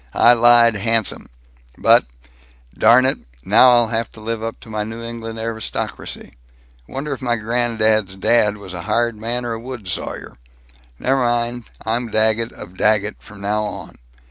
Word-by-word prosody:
I 120 - +6
lied 120 0 +5
handsome. 115 0 -1 0.5
But - - +4 0.7
Darn 120 +4 +5
it, 135 - 0 0.3
now 115 +6 +6
I'll 120 -2 +4
have 115 -1 -2
to - - -13
live 110 +1 -4
up 115 0 -5
to - - -13
my 105 -1 -2
New 115 +2 -7
England 115 -1 -7
aristocracy.... 110 0 -5 0.5
Wonder 140 +2 -4
if 135 - -8
my 120 -2 0
grand 115 +1 -2
dad's 110 -3 +2
dad 105 +1 +2
was 100 -3 -10
a 90 - -5
hired 115 +4 0
man 120 +3 -4
or 120 - -2
a 115 - -5
wood 120 -4 -8
sawyer?... 80 - -5 0.6
Ne' 130 - -1
mine; 120 -2 0 0.2
I'm 115 +1 -1
Daggett 110 +1 +2
of 90 - -11
Daggett 105 0 +1
from 105 -1 -14
now 105 +2 0
on." 105 - -8
115 Hz, 170 wpm, -19 LUFS, 110-120 Hz, 0.7 s, I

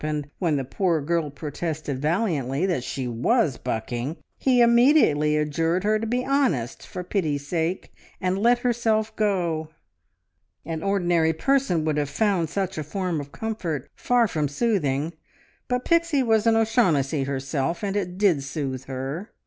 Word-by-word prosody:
and 150 -1 -2
when 170 -5 +1
the 135 - -1
poor 170 +4 0
girl 160 +1 -1
protested 150 0 -4
valiantly 155 - 0
that 175 -10 0
she 130 0 -4
was 135 - +1
bucking, 120 +7 -3 0.3
immediately 235 - +4
adjured 165 +4 0
her 215 +1 +2
to 225 - -3
be 250 +2 -1
honest, 220 - 0
for 180 - -6
pity's 155 -7 -2
sake, 170 +3 -2 0.3
and 185 +1 0
"let 240 +3 +4
herself 220 -2 +1
go!" 175 -7 0 1.0
An 160 0 -4
ordinary 175 -4 +2
person 190 - +1
would 155 -1 0
have 145 -1 0
found 190 -3 +1
such 190 -1 -2
a - - -2
form 175 0 -2
of 140 0 -10
comfort 180 - -4
far 245 -2 +2
from 155 -6 -1
soothing, 155 - 0 0.5
but 250 0 -1
Pixie 335 -5 +2
was 225 -2 +2
an 225 - +5
O'Shaughnessy 170 - +2
herself, 140 +5 -2
and 200 -1 -1
it 180 -3 -2
did 190 -8 +3
soothe 135 -2 -4
her. 135 - -5
170 Hz, 150 wpm, -24 LUFS, 145-215 Hz, 1.0 s, an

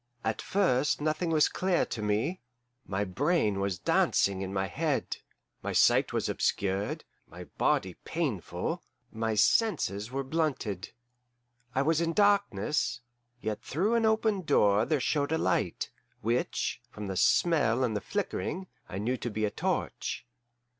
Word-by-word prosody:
At 110 - -1
first 150 -8 +2
nothing 155 +3 0
was 155 -2 +4
clear 185 -2 +1
to 115 - -5
me; 105 - 0 0.5
my 100 +1 -1
brain 110 - +1
was 100 -2 -1
dancing 95 +2 +2
in 95 -1 -3
my 95 0 0
head, 145 +6 -1 0.4
my - - -3
sight - - +4
was - - 0
obscured, 100 +1 -1 0.2
my - - -10
body 95 -1 0
painful, 145 - -2 0.3
my 110 0 -1
senses 110 - +2
were 135 +2 -2
blunted. 130 - -2 0.8
I 135 - +3
was 160 +2 +2
in 165 0 0
darkness, 155 - +2 0.4
yet 110 0 -3
through 185 - 0
an 230 -1 +3
open 220 -2 +2
door 105 - +3
there 150 +1 +1
showed 145 +2 0
a 160 - +2
light, - - 0 0.3
which, 120 +3 -1
from 105 - -7
the 95 -1 -3
smell 130 - +3
and 110 -4 -1
flickering, 195 -2 -2 0.2
I 95 - -5
knew 120 +6 -1
to 120 - -4
be 110 0 -1
a 105 - -1
torch. - - -2
130 Hz, 145 wpm, -29 LUFS, 105-165 Hz, 0.8 s, was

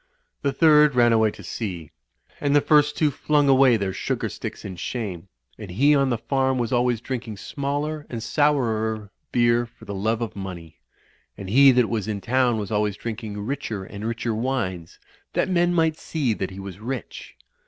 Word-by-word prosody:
The 140 - +1
third 150 -1 +5
ran 120 -1 +5
away 110 -1 +4
to - - -11
sea. 90 -9 -5 0.5
And 145 0 +1
the - - +7
first 150 0 +3
two 150 -2 +2
flung 145 0 +1
away 135 -3 +5
their 100 -2 -2
sugar - - -2
sticks - - -7
in 95 -3 -6
shame; 95 -4 -5 0.3
and 100 - -8
he 140 +12 +3
on 140 -2 +3
the 120 - 0
farm 130 +2 0
was 120 0 -1
always 120 -1 +2
drinking 120 -5 -5
smaller 145 +6 -3
and 115 -3 -5
sourer 110 -6 0 0.2
beer 120 0 +3
for 115 - -17
the 100 - -6
love 110 +4 -1
of 115 - -6
money; 90 -5 -8 0.6
and 95 -1 -7
he 135 +3 +7
that 125 -2 +3
was 110 -3 -2
in 105 -2 -2
town 120 +1 +1
was 105 -2 -4
always 105 -1 0
drink 115 0 -5
ing 105 -1 -5
richer 115 -6 -4
and 100 +2 -9
richer 115 0 -2
wines, 110 -8 -3 0.4
that - - +1
men 175 -1 +3
might 160 -2 +1
see 140 -8 -1
that 95 -3 -3
he 95 0 -10
was 95 -1 -8
rich. 125 +3 -6
120 Hz, 190 wpm, -24 LUFS, 105-140 Hz, 0.6 s, the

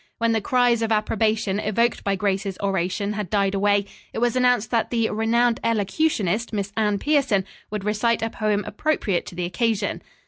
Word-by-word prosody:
When 230 0 +1
the 225 -1 +1
cries 245 +1 +2
of 225 0 -1
approbation 215 -1 +1
evoked 230 +3 0
by 200 -1 +1
Grace's 195 0 -1
oration 195 +1 -1
had 210 -4 -4
died 200 -1 +1
away, 200 0 +2 0.3
it - - -6
was 240 +1 +1
announced 245 -3 +2
that 230 -2 +1
the 230 -2 +1
"renowned 230 +2 +2
elocutionist," 225 - 0
Miss 200 -2 -3
Anne 210 -2 +1
Pierson, 270 -7 +1 0.2
would 210 -2 -4
recite 220 +2 +1
a 225 - -2
poem 210 -1 0
appropriate 210 - -1
to - - -9
the 175 0 -2
occasion. 215 +2 -1
215 Hz, 175 wpm, -23 LUFS, 200-230 Hz, 0.3 s, cries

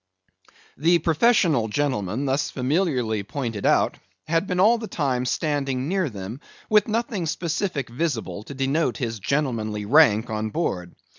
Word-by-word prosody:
The 170 +5 +4
professional 165 - +3
gentleman 125 -2 -1
thus 135 +2 0
familiarly 130 - 0
pointed 115 -1 -3
out, - - +2 0.3
had 165 +4 +1
been 180 -1 -1
all 225 +5 +5
the 220 - -5
time 130 -8 -1
standing 135 -2 -1
near 185 -2 0
them, 105 +3 -7 0.3
with 210 -1 +5
nothing 215 -5 -1
specific 165 -3 -2
visible, 120 -5 -3
to 140 - -8
denote 135 -2 0
his 115 -3 -3
gentlemanly 110 -5 -1
rank 115 -4 +4
on 110 0 -2
board. 90 - -3
140 Hz, 140 wpm, -24 LUFS, 115-165 Hz, 0.3 s, all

